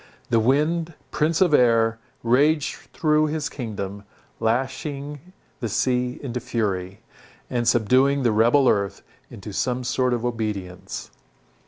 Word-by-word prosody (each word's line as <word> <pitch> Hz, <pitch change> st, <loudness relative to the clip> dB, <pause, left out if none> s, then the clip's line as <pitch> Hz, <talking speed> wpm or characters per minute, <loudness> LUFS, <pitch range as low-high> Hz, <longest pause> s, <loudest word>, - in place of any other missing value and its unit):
The 115 Hz, -, +4 dB
wind, 155 Hz, +7 st, +1 dB, 0.2 s
prince 155 Hz, +2 st, +1 dB
of 175 Hz, -5 st, +4 dB
air, 115 Hz, -3 st, +4 dB, 0.2 s
raged 145 Hz, +6 st, +3 dB, 0.2 s
through 155 Hz, -1 st, +2 dB
his 150 Hz, -1 st, -2 dB
kingdom, 100 Hz, -5 st, -5 dB, 0.4 s
lashing 140 Hz, +6 st, -2 dB, 0.3 s
the 115 Hz, -, -3 dB
sea 125 Hz, +3 st, 0 dB
into 125 Hz, -2 st, -3 dB
fury, 95 Hz, -6 st, -2 dB, 0.5 s
and 120 Hz, -2 st, 0 dB
subduing 130 Hz, +4 st, +3 dB
the 120 Hz, -, +3 dB
rebel 120 Hz, +6 st, +4 dB
earth 100 Hz, -4 st, +1 dB, 0.3 s
into 100 Hz, +1 st, -9 dB
some 125 Hz, +5 st, -1 dB
sort 125 Hz, 0 st, +1 dB
of 120 Hz, 0 st, -4 dB
obedience. 105 Hz, -6 st, -4 dB
125 Hz, 125 wpm, -23 LUFS, 110-145 Hz, 0.5 s, The